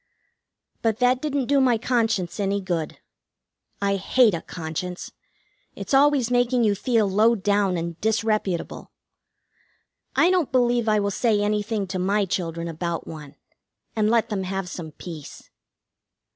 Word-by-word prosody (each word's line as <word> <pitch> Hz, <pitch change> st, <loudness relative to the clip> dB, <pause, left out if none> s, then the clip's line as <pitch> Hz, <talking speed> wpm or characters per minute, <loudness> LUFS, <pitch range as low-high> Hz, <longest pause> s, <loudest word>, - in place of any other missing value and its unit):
But 225 Hz, -2 st, +1 dB
that 250 Hz, +1 st, +2 dB
didn't 285 Hz, -3 st, -1 dB
do 280 Hz, +2 st, +3 dB
my 250 Hz, -3 st, +3 dB
conscience 220 Hz, -6 st, -1 dB
any 200 Hz, 0 st, 0 dB
good. 175 Hz, -5 st, -3 dB, 0.9 s
I 200 Hz, 0 st, +1 dB
hate 220 Hz, +3 st, +3 dB
a 165 Hz, -, -2 dB
conscience. 175 Hz, +2 st, -6 dB, 0.6 s
It's -, -, -6 dB
always 270 Hz, -3 st, +4 dB
making 245 Hz, 0 st, +2 dB
you 210 Hz, -2 st, +3 dB
feel 220 Hz, 0 st, +1 dB
low 215 Hz, +4 st, +3 dB
down 200 Hz, -2 st, +1 dB
and 170 Hz, 0 st, -5 dB
disreputable. 215 Hz, -5 st, -1 dB, 1.3 s
I 355 Hz, -, +4 dB
don't 360 Hz, -6 st, +1 dB
believe 240 Hz, -3 st, +2 dB
I 215 Hz, 0 st, +3 dB
will 200 Hz, 0 st, -1 dB
say 215 Hz, 0 st, +1 dB
anything 210 Hz, 0 st, -1 dB
to 185 Hz, 0 st, -4 dB
my 200 Hz, +3 st, +1 dB
children 170 Hz, -3 st, -3 dB
about 170 Hz, +1 st, -4 dB
one, 150 Hz, -2 st, -10 dB, 0.6 s
and 215 Hz, -1 st, +2 dB
let 230 Hz, -1 st, +2 dB
them 205 Hz, -3 st, -2 dB
have 190 Hz, 0 st, -3 dB
some 170 Hz, -3 st, -7 dB
peace. 160 Hz, -4 st, -10 dB
205 Hz, 145 wpm, -24 LUFS, 180-235 Hz, 1.3 s, always